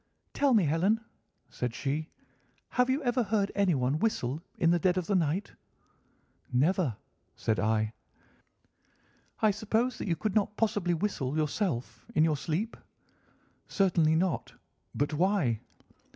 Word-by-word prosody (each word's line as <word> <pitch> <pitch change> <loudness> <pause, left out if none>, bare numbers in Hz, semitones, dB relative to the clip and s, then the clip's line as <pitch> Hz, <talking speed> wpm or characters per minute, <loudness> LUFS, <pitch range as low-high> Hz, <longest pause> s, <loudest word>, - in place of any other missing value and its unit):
"'Tell 280 -4 +3
me, 210 - +5
Helen,' 175 +9 +2 0.5
said 125 -1 -3
she, 150 +3 -2 0.6
'have 250 +1 +2
you 275 +3 +1
ever 245 0 +2
heard 205 -2 0
anyone 150 -8 +1
whistle 155 - -1 0.2
in 165 - +3
the 175 - +3
dead 180 +2 +2
of 180 - 0
the 205 - -1
night?' 180 +2 0 1.0
"'Never,' 145 - +2 0.4
said 110 -4 0
I. 110 +2 +1 1.5
"'I 215 - +6
suppose 220 +5 0
that - - -4
you 170 - +1
could 215 +3 -2
not 210 0 +1
possibly 205 -6 +1
whistle, 155 -6 -2
yourself, 155 - -2
in 155 - +5
your 160 -2 +3
sleep?' 170 +10 -2 0.9
"'Certainly 170 -5 +3
not. 180 +2 -1 0.4
But 145 +2 0
why? 165 - +2
175 Hz, 135 wpm, -30 LUFS, 150-210 Hz, 1.5 s, I